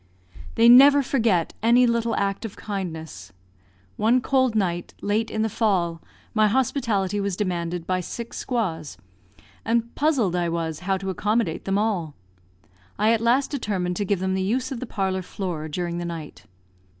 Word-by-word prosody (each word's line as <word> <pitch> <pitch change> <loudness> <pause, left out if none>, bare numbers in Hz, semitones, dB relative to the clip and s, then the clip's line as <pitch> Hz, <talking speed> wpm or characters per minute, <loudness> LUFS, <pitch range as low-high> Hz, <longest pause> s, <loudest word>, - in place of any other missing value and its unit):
They 230 +1 +5
never 275 +4 +8
forget 225 - +1
any 240 +3 +5
little 235 -1 0
act 195 +1 -1
of 220 -3 -6
kindness. 160 - -6 0.7
One 230 +4 +3
cold 260 -2 +1
night, 175 -4 -1
late 215 +2 -1
in 220 - -1
the - - +1
fall, 190 -7 0 0.3
my 215 -1 +4
hospitality 215 -5 0
was 200 -2 -1
demanded 175 -3 -2
by 185 0 0
six 230 +6 -6
squaws, 175 - -3 0.7
and 235 0 0
puzzled 265 - +1
I 175 -1 0
was 165 -2 -3
how 190 - +2
to 190 0 -4
accommodate 210 -2 -1
them 195 0 0
all. 195 -8 -1 0.8
I 215 +2 +3
at 225 - 0
last 245 +4 +2
determined 195 -10 -2
to 205 - 0
give 200 +1 +1
them 190 0 0
the 190 - 0
use 250 +7 -1
of 260 - -4
the 255 - -6
parlour 190 -3 -1
floor 175 -4 -5
during 170 +2 -3
the 175 - -4
night. 165 -4 -7
200 Hz, 165 wpm, -24 LUFS, 175-230 Hz, 0.8 s, never